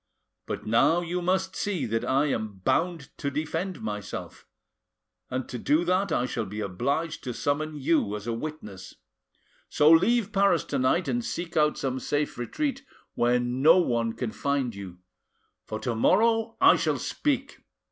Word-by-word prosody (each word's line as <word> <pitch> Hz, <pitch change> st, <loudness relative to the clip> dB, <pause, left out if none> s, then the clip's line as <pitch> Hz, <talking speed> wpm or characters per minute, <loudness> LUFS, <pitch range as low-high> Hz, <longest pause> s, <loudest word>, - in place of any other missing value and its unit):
But -, -, -5 dB
now 115 Hz, +10 st, +3 dB
you 175 Hz, +1 st, -3 dB
must 190 Hz, +1 st, 0 dB
see 200 Hz, -5 st, -2 dB
that 115 Hz, +1 st, -1 dB
I 135 Hz, +3 st, +2 dB
am 110 Hz, -8 st, -2 dB
bound 170 Hz, -4 st, 0 dB
to 140 Hz, -, -1 dB
defend 160 Hz, -, -3 dB
myself, 105 Hz, -2 st, -6 dB, 0.8 s
and 130 Hz, 0 st, -3 dB
to 125 Hz, -, -6 dB
do 155 Hz, +8 st, +2 dB
that 185 Hz, +3 st, +1 dB
I 120 Hz, -, +1 dB
shall 115 Hz, -4 st, -3 dB
be 105 Hz, +3 st, -6 dB
obliged 140 Hz, -, -2 dB
to 125 Hz, -3 st, -4 dB
summon 155 Hz, +2 st, -1 dB
you 145 Hz, -7 st, +1 dB
as 105 Hz, 0 st, -7 dB
a 115 Hz, -, -2 dB
witness. 115 Hz, -8 st, -7 dB, 0.7 s
So 150 Hz, +2 st, +5 dB
leave 205 Hz, +6 st, +4 dB
Paris 195 Hz, -4 st, +3 dB
tonight 140 Hz, +6 st, +1 dB
and 240 Hz, 0 st, -1 dB
seek 175 Hz, -7 st, -5 dB
out 150 Hz, -1 st, +3 dB
some 130 Hz, -1 st, -2 dB
safe 145 Hz, 0 st, -2 dB
retreat 275 Hz, -, -2 dB, 0.3 s
where 120 Hz, +1 st, +2 dB
no 130 Hz, +8 st, +4 dB
one 115 Hz, -9 st, +1 dB
can 120 Hz, -2 st, -4 dB
find 140 Hz, -3 st, -1 dB
you, 95 Hz, -3 st, -9 dB, 0.7 s
for -, -, -4 dB
to 120 Hz, -, -1 dB
morrow 225 Hz, -, +2 dB
I -, -, +7 dB
shall -, -, 0 dB
speak. 275 Hz, -2 st, -2 dB
150 Hz, 160 wpm, -27 LUFS, 120-180 Hz, 0.8 s, I